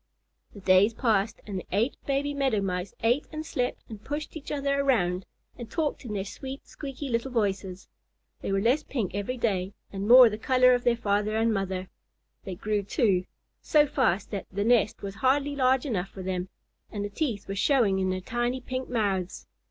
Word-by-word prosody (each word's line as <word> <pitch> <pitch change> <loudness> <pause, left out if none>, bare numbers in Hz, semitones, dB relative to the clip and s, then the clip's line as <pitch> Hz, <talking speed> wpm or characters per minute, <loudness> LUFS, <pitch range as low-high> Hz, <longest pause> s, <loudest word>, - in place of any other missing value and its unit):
The 200 - -10
days 190 +4 +4
passed, 220 -4 +1
and 200 -3 -4
the - - -10
eight 225 +8 +1
baby 285 +1 0
Meadow 270 -6 +1
Mice 180 -1 -3
ate 240 +5 +2
and 310 0 -5
slept 250 -4 -2
and 215 -2 -10
pushed 295 +3 -5
each 315 - -7
other 280 -1 0
around, 190 -10 +1 0.3
and 235 -2 -7
talked 300 +3 -2
in 220 - -5
their 195 -1 -2
sweet, 265 +6 -8
squeaky 280 0 -7
little 235 +1 -1
voices. 195 -5 -2 0.5
They - - -3
were 195 0 +1
less 255 +7 +3
pink 235 - -3
every 205 +6 -3
day 195 -5 -1 0.2
and 195 +1 -3
more 250 +1 +10
the 215 -1 -3
color 255 +1 +5
of 245 0 0
their 240 -1 +4
father 210 -1 0
and 225 0 +2
mother. 190 -2 -2 0.6
They 190 - -5
grew, 210 +2 -1
too, 195 -2 +1 0.4
so 300 -2 +4
fast 250 - 0
that 200 -3 -4
the 200 +2 -1
nest 220 -3 +2
was 195 -1 -4
hardly 275 +6 +1
large 260 -1 +2
enough 195 -8 -2
for 190 - -9
them, 185 0 -3 0.4
and 205 -2 -3
the - - -4
teeth 230 -6 -2
were 195 - -3
showing 205 -3 +3
in 190 0 0
their 185 0 -2
tiny 240 +5 -1
pink 255 +1 -5
mouths. 200 -6 -1
220 Hz, 195 wpm, -27 LUFS, 195-260 Hz, 0.6 s, more